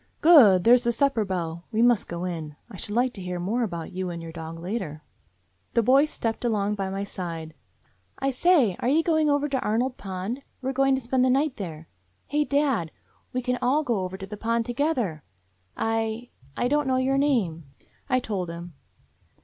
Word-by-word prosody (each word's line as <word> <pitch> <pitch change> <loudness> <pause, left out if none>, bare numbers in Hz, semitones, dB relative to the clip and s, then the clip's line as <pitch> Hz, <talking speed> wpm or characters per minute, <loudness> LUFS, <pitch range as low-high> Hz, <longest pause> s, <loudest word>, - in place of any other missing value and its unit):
"Good! 235 - +7
There's 245 +1 +6
the 235 - +2
supper 235 -1 +2
bell. 170 -3 -4
We 225 +1 +2
must 240 -4 +3
go 170 +1 -5
in. 160 -5 -5 0.2
I 195 - -9
should 205 +4 -5
like 250 +1 +2
to 195 - -8
hear 180 -1 -4
more 210 +8 -1
about 170 -8 -3
you 185 0 -3
and 170 -1 -5
your 165 -1 -8
dog 165 0 -7
later." 170 -4 -5 0.7
The 235 - +4
boy 265 +5 +5
stepped 230 -7 -3
along 210 -3 +1
by 195 -2 -3
my 195 +1 -3
side. 165 -5 -6 0.6
"I 275 0 0
say, 265 - +3
are 245 - 0
you 315 +4 +3
going 315 -2 +2
over 290 0 +2
to 270 -2 -1
Arnold 245 +3 0
Pond? 195 +6 -5 0.2
We 265 0 -2
're - - -7
going 270 0 +3
to 265 - -3
spend 250 +1 +1
the 255 - +3
night 275 +2 +1
there. 165 -6 -7 0.4
Hey, 295 +1 +1
dad, 275 - +1 0.4
we 255 0 -2
can 250 0 -1
all 270 +5 +2
go 235 -7 0
over 185 0 -4
to 190 - -7
the 210 +2 -8
Pond 230 +1 0
together. 240 - -1 0.6
I 225 +1 -2
— 135 +2 -25
I 245 - +1
don't 295 +1 +1
know 260 - +2
your 265 +1 +2
name 205 - +1
— - - -32
" - - -37
I 255 - +3
told 200 -8 -3
him. 170 0 -8
225 Hz, 210 wpm, -26 LUFS, 180-260 Hz, 0.7 s, Good